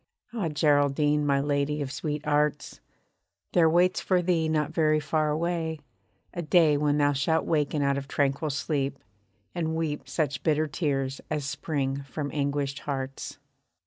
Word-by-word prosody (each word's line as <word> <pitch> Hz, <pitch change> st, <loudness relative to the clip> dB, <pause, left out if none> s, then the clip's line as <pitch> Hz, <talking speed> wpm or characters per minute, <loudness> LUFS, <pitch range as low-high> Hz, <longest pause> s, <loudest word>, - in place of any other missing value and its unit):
Ah, 205 Hz, -8 st, -1 dB
Geraldine! 145 Hz, 0 st, +2 dB
my 140 Hz, -1 st, +3 dB
lady 145 Hz, +1 st, 0 dB
of 140 Hz, -2 st, -3 dB
sweet 150 Hz, 0 st, -4 dB
arts, 150 Hz, -1 st, 0 dB, 0.7 s
There 165 Hz, -2 st, +5 dB
waits 175 Hz, +3 st, +3 dB
for 180 Hz, -2 st, +1 dB
thee 165 Hz, -3 st, +1 dB
not 155 Hz, -1 st, 0 dB
very 155 Hz, -2 st, +3 dB
far 155 Hz, +1 st, 0 dB
away, 160 Hz, 0 st, -1 dB, 0.5 s
a 175 Hz, -, -3 dB
day 160 Hz, -2 st, +4 dB
When 145 Hz, 0 st, +1 dB
thou 145 Hz, -1 st, +3 dB
shalt 160 Hz, +4 st, +1 dB
waken 150 Hz, -2 st, +1 dB
out 140 Hz, 0 st, +1 dB
of 140 Hz, -, -9 dB
tranquil 140 Hz, +2 st, 0 dB
sleep, 140 Hz, -1 st, -1 dB, 0.6 s
and 160 Hz, -2 st, -2 dB
weep 155 Hz, -2 st, -3 dB
Such 145 Hz, -3 st, -1 dB
bitter 155 Hz, 0 st, +2 dB
tears 140 Hz, -3 st, -2 dB
as 150 Hz, -3 st, -2 dB
spring 140 Hz, -2 st, -2 dB
from 140 Hz, +1 st, -5 dB
anguished 140 Hz, -1 st, -1 dB
hearts. 135 Hz, -1 st, -5 dB
150 Hz, 150 wpm, -27 LUFS, 140-160 Hz, 0.7 s, There